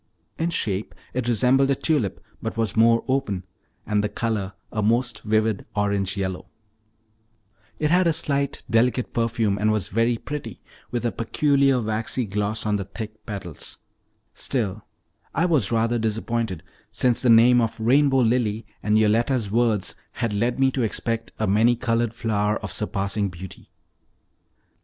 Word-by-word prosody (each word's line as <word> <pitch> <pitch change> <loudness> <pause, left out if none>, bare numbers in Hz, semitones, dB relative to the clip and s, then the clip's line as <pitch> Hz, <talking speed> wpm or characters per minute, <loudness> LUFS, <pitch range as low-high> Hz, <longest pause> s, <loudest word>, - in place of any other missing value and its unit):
In 165 +1 +1
shape 105 - -2 0.2
it 125 -1 -2
resembled 125 +4 +3
a 140 - +3
tulip, 130 - 0 0.2
but 115 0 -4
was 115 -2 0
more 115 +1 +4
open, 130 -9 -1 0.4
and 105 -1 +1
the 105 - 0
color 105 -5 -2 0.2
a 110 - -1
most 115 +1 +1
vivid 110 -1 +1
orange 100 -1 0
yellow; 95 -2 -3 1.3
it 150 0 0
had 180 0 +4
a - - +4
slight 140 -3 0
delicate 120 +2 +1
perfume, 115 -3 0
and 110 +1 +2
was 110 -4 -1
very 115 +3 +1
pretty, 130 -7 -6 0.3
with 120 -1 -3
a 120 - +1
peculiar 140 +2 +2
waxy 110 +2 -1
gloss 105 +2 -2
on 105 -1 +1
the 100 - -4
thick 110 +2 -9
petals, 95 -7 -6 0.6
still, 110 -6 -2 0.5
I 165 - +2
was 145 - +2
rather 115 +1 +1
disappointed, 110 -4 -2 0.3
since 120 +2 +1
the 125 - +2
name 120 +2 +7
of 115 -1 -2
"rainbow 135 +3 +4
lily," 115 -2 +1 0.2
and 105 0 +2
Yoletta's 110 +1 +2
words, 115 -3 +1 0.2
had 115 -3 -2
led 120 +5 0
me 135 0 +4
to 130 - -1
expect 115 0 -2
a 110 - 0
many 110 +4 +4
colored 115 -1 0
flower 105 -2 0
of 100 -4 -4
surpassing 100 0 -1
beauty. 90 +1 -10
115 Hz, 150 wpm, -24 LUFS, 105-125 Hz, 1.3 s, name